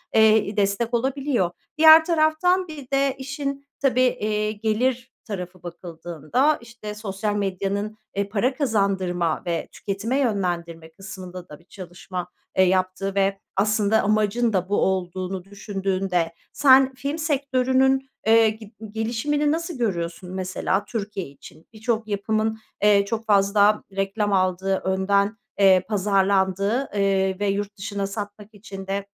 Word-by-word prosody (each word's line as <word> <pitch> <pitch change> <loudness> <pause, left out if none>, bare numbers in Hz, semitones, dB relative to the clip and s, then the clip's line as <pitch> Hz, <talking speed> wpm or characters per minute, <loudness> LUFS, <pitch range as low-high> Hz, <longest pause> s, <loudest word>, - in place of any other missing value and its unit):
eee, 220 0 +6
i 205 +2 -6
destek 205 +4 0
olabiliyor. 260 -5 0 0.3
Diğer 320 0 +9
taraftan 340 +3 +2
bir 290 -5 -9
de 275 0 +2
işin, 275 +1 -5
tabii, 260 -2 +2
eee, 215 -4 +1
gelir 230 +4 -1
tarafı 185 -3 -7
bakıldığında, 175 - -1
işte, 230 -2 -9
sosyal 210 0 -3
medyanın, 200 +2 -2 0.2
eee, 200 0 -1
para 230 +6 +1
kazandırma 190 - 0
ve 170 -1 -2
tüketime 210 +6 -3
yönlendirme 175 - -2
kısmında 185 -1 -9
da 150 - -11
bir 170 - -24
çalışma, 180 -1 -7 0.3
eee, 190 - +6
yaptığı 185 +1 0
ve 195 0 +1 0.2
aslında 210 +2 +2
amacın 215 +2 +1
da 185 -1 0
bu 205 - +1
olduğunu 185 0 -2
düşündüğünde 195 -3 -2 0.2
sen 265 -1 +5
film 280 +4 -4
sektörünün, 265 -3 +1 0.2
eee, 225 0 +6
gib 215 -1 -9 0.2
gelişimini 240 +7 0
nasıl 330 -1 -3
görüyorsun, 180 -5 -3
mesela 190 +1 -1
Türkiye 205 -4 -4
için? 140 +3 -15
Birçok 225 0 -2
yapımın, 220 +2 -1 0.2
eee, 205 -1 +5
çok 225 +2 -3
fazla 205 0 +3
reklam 200 +1 -1
aldığı, 190 0 +1
önden, 200 +3 +1 0.2
eee, 190 -2 +6
pazarlandığı, 195 +3 +1
eee, 195 -1 +1
ve 205 - 0
yurt 205 +1 -2
dışına 200 0 -3
satmak 205 +1 -7
için 195 -2 -9
de, 195 +1 -2
205 Hz, 130 wpm, -23 LUFS, 190-235 Hz, 0.3 s, Diğer